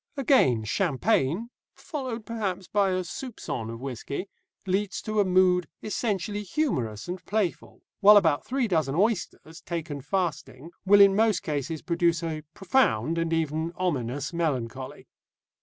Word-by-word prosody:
Again, 230 Hz, -, +3 dB
champagne 175 Hz, -, 0 dB, 0.2 s
(followed 255 Hz, -7 st, -5 dB
perhaps 195 Hz, -5 st, -3 dB
by 200 Hz, -2 st, +2 dB
a 185 Hz, 0 st, 0 dB
soupçon 175 Hz, -, -6 dB
of 115 Hz, -, -7 dB
whisky) 135 Hz, -, -5 dB, 0.4 s
leads 195 Hz, +1 st, -1 dB
to 215 Hz, -1 st, -1 dB
a -, -, +6 dB
mood 180 Hz, -2 st, +3 dB, 0.2 s
essentially 210 Hz, -2 st, -2 dB
humorous 140 Hz, -, -2 dB
and 180 Hz, +1 st, -5 dB
playful, 205 Hz, -4 st, -2 dB, 0.2 s
while 210 Hz, +1 st, +8 dB
about 160 Hz, -7 st, +3 dB
three 260 Hz, -2 st, -1 dB
dozen 155 Hz, -7 st, 0 dB
oysters, 175 Hz, -4 st, -1 dB
taken 160 Hz, -4 st, -5 dB
fasting, 160 Hz, -2 st, -3 dB, 0.2 s
will 205 Hz, +1 st, +7 dB
in 195 Hz, -1 st, +7 dB
most 215 Hz, -3 st, +2 dB
cases 150 Hz, +1 st, -3 dB
produce 170 Hz, -1 st, +1 dB
a 160 Hz, -2 st, -3 dB
profound 165 Hz, -, +1 dB
and 165 Hz, 0 st, -1 dB
even 160 Hz, +1 st, -1 dB
ominous 145 Hz, -4 st, -2 dB
melancholy. 130 Hz, -6 st, -3 dB
175 Hz, 135 wpm, -27 LUFS, 150-205 Hz, 0.4 s, while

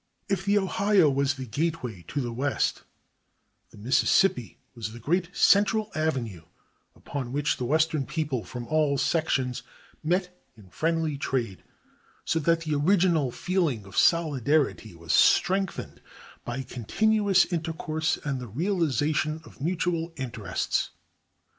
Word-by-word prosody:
If 195 Hz, -2 st, -1 dB
the 205 Hz, +1 st, +3 dB
Ohio 195 Hz, -4 st, +3 dB
was 140 Hz, 0 st, +1 dB
the 130 Hz, -1 st, -6 dB
gateway 125 Hz, -, -3 dB
to 145 Hz, -, -2 dB
the 120 Hz, -2 st, -4 dB
West, 135 Hz, +4 st, -1 dB, 0.9 s
the -, -, -17 dB
Mississippi 130 Hz, -, +2 dB, 0.2 s
was 110 Hz, -3 st, -6 dB
the 120 Hz, -, -9 dB
great 170 Hz, +8 st, 0 dB
central 210 Hz, +2 st, +3 dB
avenue 125 Hz, -, -2 dB, 0.5 s
upon 135 Hz, -4 st, -6 dB
which 145 Hz, +2 st, 0 dB
the 125 Hz, -, -3 dB
western 155 Hz, 0 st, +1 dB
people 150 Hz, -8 st, -2 dB
from 120 Hz, -1 st, -7 dB
all 150 Hz, 0 st, +1 dB
sections 135 Hz, -6 st, 0 dB, 0.4 s
met 180 Hz, +2 st, 0 dB, 0.2 s
in 100 Hz, -4 st, -16 dB
friendly 160 Hz, -3 st, -1 dB
trade, 120 Hz, -9 st, -2 dB, 0.6 s
so 165 Hz, -, +1 dB
that 165 Hz, +2 st, +2 dB
the 155 Hz, -2 st, -2 dB
original 165 Hz, -2 st, +3 dB
feeling 155 Hz, -, -1 dB
of 95 Hz, -1 st, -12 dB
solidarity 145 Hz, -, +2 dB
was 85 Hz, 0 st, -3 dB
strengthened 190 Hz, 0 st, +2 dB, 0.4 s
by 125 Hz, +3 st, -4 dB
continuous 200 Hz, -, +2 dB
intercourse 160 Hz, -1 st, -1 dB
and 135 Hz, -3 st, -2 dB
the 125 Hz, -, -7 dB
realization 155 Hz, -, 0 dB
of -, -, -16 dB
mutual 170 Hz, 0 st, -1 dB
interests. 130 Hz, -6 st, -2 dB
155 Hz, 130 wpm, -27 LUFS, 125-170 Hz, 0.9 s, the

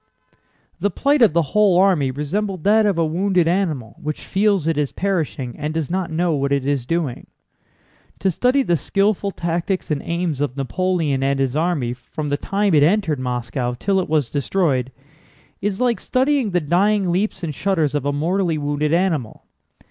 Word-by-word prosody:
The 205 Hz, -, +1 dB
plight 285 Hz, +5 st, +1 dB
of 225 Hz, -9 st, +6 dB
the 170 Hz, 0 st, +3 dB
whole 210 Hz, -4 st, +4 dB
army 180 Hz, -8 st, +3 dB
resembled 175 Hz, +7 st, -3 dB
that 215 Hz, +1 st, +4 dB
of 195 Hz, -4 st, +1 dB
a 165 Hz, -, +2 dB
wounded 180 Hz, +1 st, +1 dB
animal 165 Hz, -, -1 dB
which 150 Hz, 0 st, -5 dB
feels 195 Hz, -4 st, +1 dB
it 165 Hz, -, +1 dB
is 145 Hz, -2 st, -1 dB
perishing 160 Hz, -10 st, -2 dB
and 150 Hz, +1 st, -3 dB
does 160 Hz, -1 st, -2 dB
not 185 Hz, -1 st, -1 dB
know 170 Hz, +2 st, 0 dB
what 140 Hz, -1 st, -1 dB
it 140 Hz, -2 st, +1 dB
is 140 Hz, -3 st, -1 dB
doing. 165 Hz, -7 st, -2 dB, 0.9 s
To 190 Hz, -, +1 dB
study 255 Hz, -, +2 dB
the 175 Hz, -, +1 dB
skillful 200 Hz, +4 st, 0 dB
tactics 175 Hz, 0 st, -2 dB
and 145 Hz, -, 0 dB
aims 170 Hz, -4 st, -2 dB
of 140 Hz, -2 st, -2 dB
Napoleon 160 Hz, -1 st, 0 dB
and 135 Hz, 0 st, +1 dB
his 135 Hz, -1 st, 0 dB
army 155 Hz, -7 st, 0 dB
from 145 Hz, +4 st, -6 dB
the 145 Hz, -, +1 dB
time 200 Hz, +3 st, 0 dB
it 150 Hz, -, +5 dB
entered 165 Hz, -2 st, +2 dB
Moscow 125 Hz, 0 st, -3 dB
till 195 Hz, +7 st, +1 dB
it 185 Hz, -, -3 dB
was 150 Hz, -6 st, +1 dB
destroyed 140 Hz, -4 st, 0 dB, 0.7 s
is 200 Hz, 0 st, -2 dB
like 245 Hz, -2 st, +1 dB
studying 260 Hz, -2 st, +1 dB
the 180 Hz, -2 st, 0 dB
dying 185 Hz, +4 st, +2 dB
leaps 190 Hz, +2 st, -1 dB
and 155 Hz, -3 st, -3 dB
shudders 165 Hz, -3 st, 0 dB
of 145 Hz, -3 st, -1 dB
a 145 Hz, -, 0 dB
mortally 165 Hz, +3 st, 0 dB
wounded 145 Hz, +1 st, -1 dB
animal. 165 Hz, -, -1 dB
165 Hz, 180 wpm, -21 LUFS, 145-195 Hz, 0.9 s, of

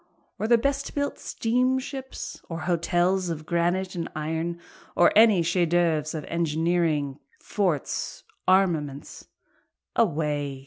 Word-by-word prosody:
or 215 Hz, -, -1 dB
the 235 Hz, 0 st, +6 dB
best 280 Hz, +3 st, -1 dB
built 285 Hz, 0 st, -2 dB
steamships? 260 Hz, +3 st, -2 dB
Or 165 Hz, -1 st, -4 dB
hotels 175 Hz, +2 st, +1 dB
of 155 Hz, -2 st, -4 dB
granite 175 Hz, +3 st, 0 dB
and 170 Hz, -2 st, -4 dB
iron? 160 Hz, +3 st, -3 dB, 0.4 s
or 175 Hz, -, +5 dB
any 215 Hz, -5 st, +6 dB
chef 175 Hz, 0 st, +1 dB
d'oeuvres 165 Hz, -3 st, +1 dB
of 150 Hz, -, -5 dB
engineering, 160 Hz, -3 st, 0 dB, 0.2 s
forts, -, -, -2 dB, 0.2 s
armaments? 165 Hz, -7 st, +1 dB, 0.7 s
Away! 150 Hz, -8 st, 0 dB
170 Hz, 115 wpm, -26 LUFS, 155-195 Hz, 0.7 s, the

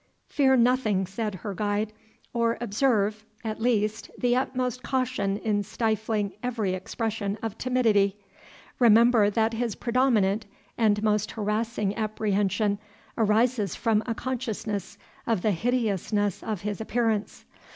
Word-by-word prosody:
"Fear 265 Hz, -2 st, +3 dB
nothing," 235 Hz, -6 st, +2 dB
said 205 Hz, +2 st, -3 dB
her 205 Hz, -, -2 dB
guide; 210 Hz, +2 st, -1 dB, 0.4 s
"or 235 Hz, -1 st, +1 dB
observe, 215 Hz, -2 st, +1 dB, 0.2 s
at 220 Hz, -1 st, -4 dB
least, 215 Hz, -2 st, 0 dB
the 245 Hz, 0 st, +2 dB
utmost 255 Hz, -1 st, -1 dB
caution 255 Hz, -7 st, -1 dB
in 210 Hz, -2 st, 0 dB
stifling 215 Hz, -1 st, -1 dB
every 225 Hz, -6 st, -1 dB
expression 205 Hz, +2 st, -3 dB
of 225 Hz, -2 st, -3 dB
timidity. 220 Hz, -6 st, +2 dB, 0.6 s
Remember 230 Hz, -2 st, +6 dB
that 220 Hz, +2 st, +1 dB
his 230 Hz, -2 st, -2 dB
predominant 225 Hz, -5 st, +1 dB, 0.3 s
and 210 Hz, -2 st, +2 dB
most 210 Hz, -1 st, +1 dB
harassing 210 Hz, -1 st, -1 dB
apprehension 205 Hz, -1 st, 0 dB, 0.4 s
arises 220 Hz, -2 st, +2 dB
from 220 Hz, -2 st, +2 dB
a 230 Hz, -, -1 dB
consciousness 220 Hz, -6 st, -4 dB, 0.3 s
of 220 Hz, -6 st, +1 dB
the 215 Hz, -, +3 dB
hideousness 205 Hz, -1 st, 0 dB
of 215 Hz, -5 st, -4 dB
his 210 Hz, 0 st, -3 dB
appearance. 220 Hz, -2 st, -1 dB
220 Hz, 120 wpm, -26 LUFS, 205-235 Hz, 0.6 s, Remember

